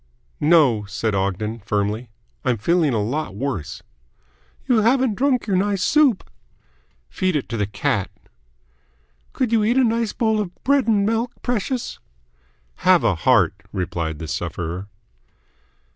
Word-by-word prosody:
"No," 145 -9 +4
said 105 +2 -2
Ogden 100 +4 -2
firmly. 105 +3 -2 0.3
"I'm 125 -3 +1
feeling 160 - +2
a 110 -4 0
lot 125 -2 -3
worse." 115 - -4 0.8
"You 250 -3 +3
haven't 240 +2 +3
drunk 260 +2 +1
your 200 - 0
nice 200 -1 0
soup." 285 -7 +3 0.8
"Feed 185 - -1
it 145 - -1
to 115 - -3
the 105 -2 0
cat." 100 -1 -1 1.2
"Could 250 -4 -1
you 225 -2 +3
eat 235 +4 +2
a 265 - +5
nice 230 -2 +1
bowl 220 -2 0
of 200 - -3
bread 280 -3 +2
and 205 -3 +3
milk, 225 +3 0
precious?" 245 +1 -2 0.8
"Have 185 -6 +4
a 115 -4 +3
heart," 100 +1 +3 0.2
replied 85 -4 -3
the 80 - -7
sufferer. 90 +4 -4
155 Hz, 140 wpm, -21 LUFS, -, 1.2 s, a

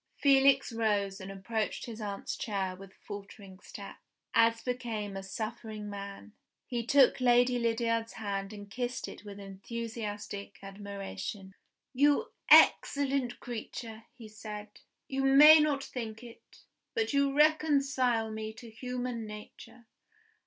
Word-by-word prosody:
Felix 275 -2 +4
rose 205 -4 0
and 190 +1 -7
approached 215 +3 -3
his 225 -2 -8
aunt's 200 -1 -4
chair 195 -4 -2
with 195 +1 -12
faltering 200 -1 -10
steps, - - -10 0.3
as 230 0 +4
became 230 -5 -3
a 195 - -4
suffering 215 +1 -6
man. 200 +1 -8 0.3
He 240 -2 -3
took 265 +2 +4
Lady 245 0 +4
Lydiard's 230 -1 0
hand 200 -2 -4
and 205 -1 -9
kissed 245 +4 -4
it - - -10
with 205 -1 -9
enthusiastic 205 0 -6
admiration. 195 - -7 0.4
"You 290 - +3 0.2
excellent 275 -3 +5
creature!" 225 -1 -7
he 235 -3 -11
said. 210 0 -8 0.4
"You 270 0 -2
may 295 +4 +9
not 295 -2 +1
think 225 -3 -6
it, 235 -1 -15 0.3
but 450 -8 0
you 280 0 +3
reconcile 275 -6 +2
me 220 0 -5
to 225 +1 -12
human 245 -1 -4
nature. 210 +3 -11
225 Hz, 125 wpm, -31 LUFS, 205-250 Hz, 0.4 s, may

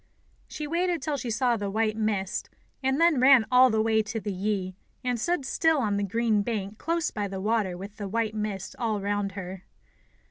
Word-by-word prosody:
She 300 - -6
waited 345 +2 0
till 300 0 -1
she 255 -3 -4
saw 235 +2 +2
the 205 -1 -3
white 215 +1 0
mist, 210 -4 -1 0.3
and 265 +2 +1
then 335 -5 +4
ran 260 -3 +7
all 255 +1 +7
the 220 -1 +2
way 220 0 +3
to 220 +2 -4
the 205 -2 -4
Yi, 190 -1 -2 0.3
and 250 -2 -1
stood 345 +2 0
still 320 +3 +2
on 210 -6 0
the 205 - 0
green 220 +1 +1
bank 210 -1 -4
close 335 +1 -1
by 205 -2 -2
the 195 -1 -5
water 205 -3 0
with 200 +3 -9
the 205 - -4
white 220 +1 -1
mist 210 -3 -4
all 220 -4 0
round 200 0 -1
her. 185 -1 -7
220 Hz, 205 wpm, -27 LUFS, 200-255 Hz, 0.3 s, ran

